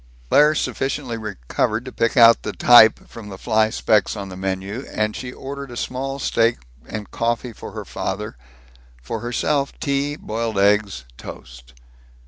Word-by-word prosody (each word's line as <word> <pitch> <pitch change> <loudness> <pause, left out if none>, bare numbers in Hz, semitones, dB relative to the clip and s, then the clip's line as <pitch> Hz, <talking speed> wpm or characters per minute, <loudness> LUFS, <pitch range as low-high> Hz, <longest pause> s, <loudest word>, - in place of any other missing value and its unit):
Claire 150 +1 +5
sufficiently 135 -4 -2
recovered 110 - -2
to 130 - -7
pick 115 -1 0
out 115 -1 +7
the - - -5
type 115 -3 +6
from 110 -3 -10
the 95 - -8
fly 110 0 +2
specks 105 -2 +1
on 100 -2 -6
the 90 - -8
menu, 95 +5 -4
and 110 0 -1
she 125 -1 -6
ordered 140 +1 -7
a 120 - -8
small 135 +3 -3
steak 115 -3 +1 0.3
and 105 -1 -7
coffee 120 +1 -2
for - - -10
her - - -6
father; 105 +3 -4 0.6
for 65 - -5
herself 140 +4 -1
tea, 140 +1 -1
boiled 110 -4 -4
eggs, 100 - +2
toast. - - -11
115 Hz, 155 wpm, -21 LUFS, 105-125 Hz, 0.6 s, out